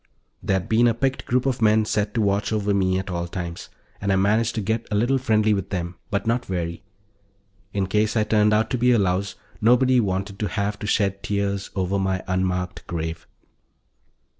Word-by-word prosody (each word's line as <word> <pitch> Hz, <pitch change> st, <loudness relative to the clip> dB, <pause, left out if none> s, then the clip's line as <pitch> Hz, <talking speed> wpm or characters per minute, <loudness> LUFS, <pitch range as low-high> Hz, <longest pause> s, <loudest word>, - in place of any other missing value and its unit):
There'd 95 Hz, -2 st, 0 dB
been 115 Hz, +2 st, +4 dB
a 115 Hz, -, +2 dB
picked 135 Hz, +2 st, -1 dB
group 125 Hz, +1 st, +1 dB
of 130 Hz, -3 st, -1 dB
men 110 Hz, 0 st, +4 dB
set 105 Hz, 0 st, -1 dB
to 115 Hz, -, +2 dB
watch 100 Hz, 0 st, +1 dB
over 105 Hz, -2 st, 0 dB
me 95 Hz, -1 st, +2 dB
at 95 Hz, 0 st, -4 dB
all 85 Hz, 0 st, -2 dB
times, 85 Hz, -1 st, -6 dB, 0.3 s
and 100 Hz, 0 st, 0 dB
I -, -, +3 dB
managed 110 Hz, +4 st, +2 dB
to 110 Hz, -, -1 dB
get 110 Hz, +3 st, -2 dB
a 105 Hz, -, -1 dB
little 120 Hz, +6 st, +2 dB
friendly 110 Hz, -3 st, +2 dB
with 95 Hz, -2 st, -2 dB
them, 85 Hz, -2 st, -3 dB
but 100 Hz, 0 st, -1 dB
not 120 Hz, +2 st, +1 dB
very. 85 Hz, -4 st, -4 dB, 0.9 s
In 100 Hz, -2 st, 0 dB
case 105 Hz, +4 st, +1 dB
I 110 Hz, -, +3 dB
turned 105 Hz, 0 st, +3 dB
out 110 Hz, +1 st, +2 dB
to 125 Hz, -, 0 dB
be 125 Hz, +1 st, +4 dB
a -, -, +4 dB
louse, 95 Hz, -1 st, 0 dB, 0.3 s
nobody 125 Hz, +3 st, +4 dB
wanted 100 Hz, -1 st, -2 dB
to 105 Hz, -, 0 dB
have 105 Hz, 0 st, -2 dB
to 105 Hz, -, -5 dB
shed 100 Hz, -2 st, +1 dB
tears 100 Hz, -1 st, -2 dB
over 95 Hz, +1 st, 0 dB
my 95 Hz, -1 st, -1 dB
unmarked 90 Hz, -1 st, -2 dB
grave. 80 Hz, -1 st, -4 dB
100 Hz, 200 wpm, -23 LUFS, 95-110 Hz, 0.9 s, been